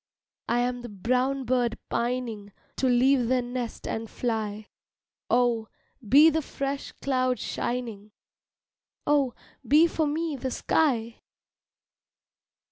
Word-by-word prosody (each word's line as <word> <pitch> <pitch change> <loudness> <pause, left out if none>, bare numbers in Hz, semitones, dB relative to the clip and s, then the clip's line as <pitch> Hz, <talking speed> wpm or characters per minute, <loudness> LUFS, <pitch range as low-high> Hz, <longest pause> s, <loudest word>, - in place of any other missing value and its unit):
I 240 +1 +2
am 245 0 -1
the 240 - -8
brown 255 +7 0
bird 245 -2 0
pining 235 -4 -2 0.3
To 265 - +1
leave 250 0 +4
the 255 0 +2
nest 245 -1 -5
and 225 0 -4
fly 220 -3 -3 0.6
Oh, 240 -2 +2 0.4
be 300 +7 +8
the 320 +1 0
fresh 275 -1 -4
cloud 255 -2 +1
shining, 230 -4 -4 1.0
Oh, 285 -4 +2 0.3
be 305 +4 +6
for 320 -2 0
me 315 +1 -1
the 260 0 -3
sky! 235 -5 0
250 Hz, 115 wpm, -27 LUFS, 235-275 Hz, 1.0 s, be